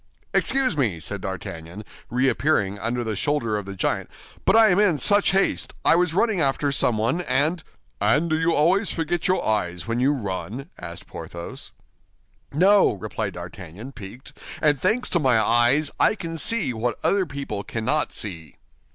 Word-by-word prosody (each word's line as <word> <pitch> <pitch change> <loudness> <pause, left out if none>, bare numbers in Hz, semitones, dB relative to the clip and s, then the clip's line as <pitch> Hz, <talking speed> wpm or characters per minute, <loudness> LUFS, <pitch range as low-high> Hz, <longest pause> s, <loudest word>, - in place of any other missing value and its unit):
"Excuse 265 -7 +2
me," 110 - 0
said 100 +4 -4
D'Artagnan, 90 +1 -7 0.2
reappearing 125 -5 +1
under 120 +3 -2
the 110 -2 -3
shoulder 115 -2 0
of 105 -2 -4
the 100 - -6
giant, - - -1 0.4
"but - - +4
I 225 -1 +7
am 180 - +3
in 190 -7 +4
such 205 +9 +3
haste—I 195 -3 +1
was 175 -1 +1
running 210 -3 +2
after 140 0 +1
someone 120 +4 +2
and—" 160 +1 +1 0.4
"And 155 +4 +2
do 155 -1 0
you 165 +1 +2
always 180 +7 +2
forget 165 +1 -2
your 185 0 +1
eyes 90 -5 -1
when 115 +1 -2
you 135 +3 +3
run?" 120 - -5
asked 85 0 -8
Porthos. 85 0 -9 0.8
"No," 190 +7 +4
replied 100 - -5
D'Artagnan, 105 - -9
piqued, 115 +2 -11 0.3
"and 145 -4 +2
thanks 250 +3 +1
to 175 - +2
my 130 -6 +3
eyes, 120 +7 +3
I - - +4
can 165 -5 -6
see 195 - 0
what 115 +1 -2
other 195 -2 +2
people 140 -8 -5
cannot 130 +9 0
see." 80 -8 -5
135 Hz, 160 wpm, -23 LUFS, 105-170 Hz, 0.8 s, I